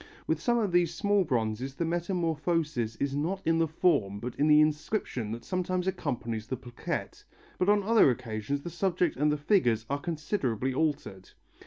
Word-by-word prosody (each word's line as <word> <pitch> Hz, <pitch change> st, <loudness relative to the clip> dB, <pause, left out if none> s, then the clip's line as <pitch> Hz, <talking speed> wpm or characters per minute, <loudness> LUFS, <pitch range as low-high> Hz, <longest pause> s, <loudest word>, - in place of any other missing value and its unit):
With 160 Hz, 0 st, -1 dB
some 240 Hz, +6 st, +2 dB
of 210 Hz, -5 st, 0 dB
these 175 Hz, -1 st, +2 dB
small 205 Hz, 0 st, +2 dB
bronzes 125 Hz, -2 st, -2 dB
the 170 Hz, -, -1 dB
metamorphosis 165 Hz, -, -1 dB
is 140 Hz, +2 st, -2 dB
not 170 Hz, +7 st, -1 dB
in 165 Hz, 0 st, +2 dB
the 165 Hz, -, +3 dB
form 145 Hz, -, +1 dB
but 120 Hz, +2 st, -5 dB
in 150 Hz, -, +2 dB
the 150 Hz, 0 st, +7 dB
inscription 155 Hz, -, 0 dB
that 115 Hz, +1 st, -6 dB
sometimes 185 Hz, -1 st, -1 dB
accompanies 120 Hz, -, -3 dB
the 130 Hz, -, -3 dB
plaquette, 120 Hz, -1 st, -5 dB, 0.4 s
but 185 Hz, -, +2 dB
on 205 Hz, -1 st, +4 dB
other 220 Hz, -6 st, +5 dB
occasions 125 Hz, +2 st, -3 dB
the 170 Hz, -, -6 dB
subject 175 Hz, -3 st, 0 dB
and 150 Hz, +4 st, +2 dB
the 150 Hz, -, 0 dB
figures 125 Hz, -, +2 dB
are 140 Hz, -, 0 dB
considerably 145 Hz, -, -2 dB
altered. 140 Hz, -10 st, -2 dB
150 Hz, 175 wpm, -29 LUFS, 125-175 Hz, 0.4 s, the